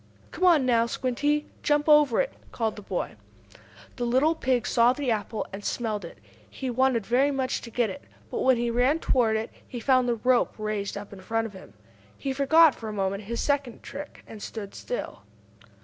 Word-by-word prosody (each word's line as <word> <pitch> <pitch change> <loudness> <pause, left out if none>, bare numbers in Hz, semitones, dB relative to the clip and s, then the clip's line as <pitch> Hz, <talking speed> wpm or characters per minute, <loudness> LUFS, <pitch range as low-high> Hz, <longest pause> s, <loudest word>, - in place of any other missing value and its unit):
"Come 365 +2 -1
on, 325 -7 +5
now, 235 -2 +3
Squinty! 290 +5 0 0.2
Jump 295 0 +1
over 295 -5 +5
it!" - - -3 0.2
called 225 -2 -1
the 210 - -9
boy. - - -4 0.8
The 245 - -2
little 260 +7 +3
pig 260 -6 0
saw 240 +1 +4
the 265 -2 -1
apple, 215 0 -2
and 200 +1 -7
smelled 215 -4 -2
it. 170 - -11 0.3
He 260 -2 -4
wanted 250 -3 +2
very 255 +6 +3
much 265 -2 -1
to 235 - -9
get 230 -2 0
it. 140 - -10 0.3
But, - - -2
when 260 -1 +4
he 235 0 0
ran 250 +6 +3
toward 240 -8 +2
it, 220 +1 -2 0.2
he 245 - -6
found 255 +1 +3
the 235 - +2
rope 250 +2 +2
raised 215 -2 -3
up 205 0 -8
in 190 - -11
front 225 +4 -1
of 220 - -7
him. 190 - -13 0.4
He 270 -1 -3
forgot, 300 +3 +6
for 225 - -7
a - - -4
moment, 195 0 -2
his 235 +3 -3
second 280 -5 -1
trick, 290 +1 -9
and 215 -2 -11
stood 205 -2 -7
still. 245 - -5
245 Hz, 200 wpm, -26 LUFS, 220-275 Hz, 0.8 s, forgot